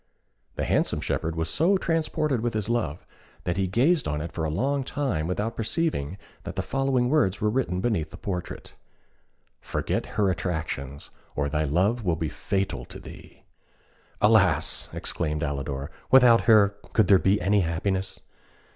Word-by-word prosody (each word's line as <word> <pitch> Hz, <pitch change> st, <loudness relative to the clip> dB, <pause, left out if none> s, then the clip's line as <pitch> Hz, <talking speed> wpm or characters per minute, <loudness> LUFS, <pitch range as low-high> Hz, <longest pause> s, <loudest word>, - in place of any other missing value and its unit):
The -, -, -2 dB
handsome -, -, +1 dB
shepherd 80 Hz, 0 st, -2 dB
was 80 Hz, 0 st, -1 dB
so 170 Hz, -, +2 dB
transported 155 Hz, -6 st, 0 dB
with 120 Hz, -1 st, -2 dB
his 110 Hz, 0 st, -2 dB
love, 110 Hz, -10 st, -1 dB, 0.4 s
that 90 Hz, 0 st, -2 dB
he 95 Hz, -1 st, +1 dB
gazed 135 Hz, -, +2 dB
on 75 Hz, 0 st, -1 dB
it 85 Hz, +2 st, -5 dB
for 80 Hz, -, -4 dB
a 80 Hz, -, 0 dB
long 135 Hz, -, 0 dB
time 130 Hz, -, -2 dB
without 105 Hz, +6 st, -2 dB
perceiving 110 Hz, -, -1 dB, 0.3 s
that 90 Hz, -, -6 dB
the 95 Hz, -, -1 dB
following 135 Hz, -1 st, +1 dB
words 125 Hz, -10 st, +2 dB
were 105 Hz, 0 st, +1 dB
written 105 Hz, -7 st, -1 dB
beneath 95 Hz, -9 st, 0 dB
the -, -, -11 dB
portrait: 90 Hz, -3 st, -5 dB, 0.9 s
"Forget -, -, -2 dB
her 100 Hz, -3 st, +3 dB
attractions, 75 Hz, -6 st, -4 dB, 0.2 s
or 70 Hz, 0 st, 0 dB
thy 75 Hz, +1 st, 0 dB
love 95 Hz, -, +1 dB
will 85 Hz, -4 st, +1 dB
be 80 Hz, -1 st, -2 dB
fatal 95 Hz, +3 st, -2 dB
to -, -, -10 dB
thee." -, -, -13 dB, 0.8 s
"Alas!" -, -, +3 dB
exclaimed 75 Hz, -2 st, -2 dB
Alidor, 70 Hz, 0 st, -3 dB, 0.2 s
"without 125 Hz, -3 st, +6 dB
her 105 Hz, -3 st, +6 dB, 0.2 s
could 110 Hz, -, +4 dB
there 95 Hz, 0 st, +6 dB
be 95 Hz, +3 st, +2 dB
any 100 Hz, +2 st, +2 dB
happiness?" 95 Hz, +3 st, -2 dB
95 Hz, 160 wpm, -26 LUFS, 80-120 Hz, 0.9 s, without